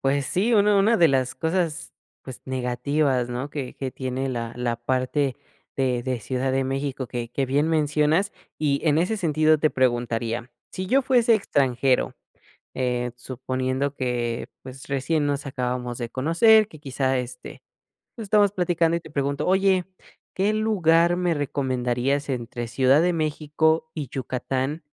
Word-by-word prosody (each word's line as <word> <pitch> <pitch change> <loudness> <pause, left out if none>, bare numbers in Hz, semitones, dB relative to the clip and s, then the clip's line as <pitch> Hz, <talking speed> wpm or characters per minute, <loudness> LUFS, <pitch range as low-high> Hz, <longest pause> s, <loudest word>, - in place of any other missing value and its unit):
Pues 135 0 +1
sí, 215 - +1
una 205 0 +4
una 220 +4 +4
de 170 -4 +5
las 130 -1 +1
cosas 160 +1 -2 0.3
pues 130 -2 -9
negativas, 130 +1 0
¿no? 125 +4 -4
Que 140 -4 -5
que 135 -1 -4
tiene 130 +1 -3
la 115 -2 -3
la 120 -1 -1
parte 130 +3 -1 0.4
de 125 -3 0
de 125 -1 -2
Ciudad 130 +3 -2
de 135 0 +1
México, 135 -1 -3
que 120 -1 -5
que 135 +1 -1
bien 145 +4 +1
mencionas 155 +4 +2 0.3
y 140 -2 +1
en 150 +1 +4
ese 190 +6 +1
sentido 155 -3 +3
te 155 +1 +2
preguntaría, 120 -1 -1 0.2
si 185 0 -4
yo 270 +7 +3
fuese 245 -3 +4
extranjero, 135 - +1 0.6
eh, 125 -1 -1
suponiendo 130 +2 -3
que, 120 -3 -2
pues, 130 0 -11
recién 145 +3 0
nos 145 -1 -1
acabamos 125 -2 -3
de 120 -2 -4
conocer, 200 - +4
que 155 - -14
quizá, 135 -2 -1
este, 125 0 -8 0.5
pues, 225 - -7
estamos 205 -1 +4
platicando 175 -3 +1
y - - -3
te 155 -2 -13
pregunto: 140 -1 -1
"Oye, 190 -1 +3 0.5
¿qué 200 +3 +1
lugar 175 -6 +3
me 175 -2 +1
recomendarías 135 0 -1
entre 120 -2 -4
Ciudad 135 +5 +4
de 180 +1 +2
México 160 0 0
y 150 -5 -4
Yucatán 130 +4 -3
140 Hz, 155 wpm, -24 LUFS, 130-165 Hz, 0.6 s, de